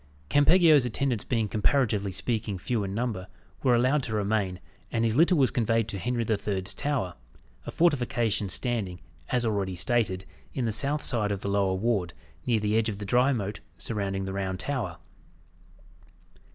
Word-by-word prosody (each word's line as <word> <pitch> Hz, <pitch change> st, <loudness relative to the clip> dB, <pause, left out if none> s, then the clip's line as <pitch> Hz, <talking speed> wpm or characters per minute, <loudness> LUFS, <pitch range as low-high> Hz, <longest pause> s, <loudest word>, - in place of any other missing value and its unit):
Campeggio's 155 Hz, -1 st, +6 dB
attendants 125 Hz, -1 st, -1 dB
being 115 Hz, -3 st, 0 dB
comparatively 105 Hz, -2 st, +1 dB
speaking, 110 Hz, -1 st, -2 dB
few 110 Hz, +4 st, -1 dB
in 95 Hz, 0 st, -4 dB
number, 110 Hz, -5 st, -2 dB, 0.3 s
were 125 Hz, -3 st, +4 dB
allowed 130 Hz, +5 st, +3 dB
to 115 Hz, -4 st, -3 dB
remain, 100 Hz, -3 st, 0 dB, 0.3 s
and 115 Hz, 0 st, +1 dB
his 110 Hz, -1 st, +1 dB
litter 170 Hz, +5 st, +5 dB
was 135 Hz, -5 st, +3 dB
conveyed 115 Hz, -2 st, +1 dB
to 100 Hz, -, -4 dB
Henry 120 Hz, +4 st, -1 dB
the 110 Hz, -1 st, 0 dB
Third's 100 Hz, -1 st, -3 dB
Tower 140 Hz, -11 st, -1 dB, 0.5 s
a -, -, -2 dB
fortification 120 Hz, -, +1 dB
standing, 100 Hz, -4 st, -1 dB, 0.3 s
as 120 Hz, -1 st, +1 dB
already 100 Hz, -4 st, -1 dB
stated, 95 Hz, -2 st, 0 dB, 0.3 s
in 130 Hz, -, 0 dB
the 115 Hz, -, 0 dB
south 140 Hz, +7 st, +1 dB
side 105 Hz, -4 st, +1 dB
of 100 Hz, -1 st, -2 dB
the 100 Hz, -, -3 dB
lower 100 Hz, -2 st, +1 dB
ward, 95 Hz, -4 st, -1 dB, 0.3 s
near 115 Hz, -3 st, +3 dB
the 105 Hz, 0 st, 0 dB
edge 115 Hz, 0 st, +2 dB
of 100 Hz, -, -4 dB
the 105 Hz, -, -6 dB
dry 125 Hz, +6 st, +3 dB
moat 105 Hz, -5 st, -2 dB, 0.2 s
surrounding 100 Hz, -3 st, -2 dB
the 95 Hz, -, -4 dB
Round 95 Hz, -1 st, -2 dB
Tower. 115 Hz, -8 st, -3 dB
110 Hz, 170 wpm, -27 LUFS, 100-125 Hz, 0.5 s, Campeggio's